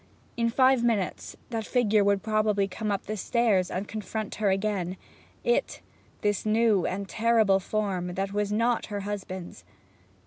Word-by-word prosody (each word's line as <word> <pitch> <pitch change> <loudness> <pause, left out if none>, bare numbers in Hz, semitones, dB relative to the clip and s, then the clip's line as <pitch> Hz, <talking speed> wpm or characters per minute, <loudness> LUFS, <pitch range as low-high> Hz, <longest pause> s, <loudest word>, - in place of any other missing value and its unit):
In 230 0 +1
five 260 0 +4
minutes 220 -6 -1
that 225 -1 -2
figure 215 -4 +3
would 200 -1 +2
probably 215 -2 +1
come 210 +2 -3
up 200 - -2
the 215 - -3
stairs 210 -3 +1
and 195 +3 -3
confront 215 0 -4
her 205 - +3
again; 190 -2 -1 0.5
it, 485 - 0 0.4
this 205 -1 0
new 215 -3 +3
and 195 +1 -3
terrible 220 -3 +3
form, 185 -3 -2
that 195 +1 -2
was 205 0 -1
not 230 +3 +1
her 205 -1 -4
husband's. 190 -3 -6
210 Hz, 150 wpm, -27 LUFS, 195-225 Hz, 0.5 s, five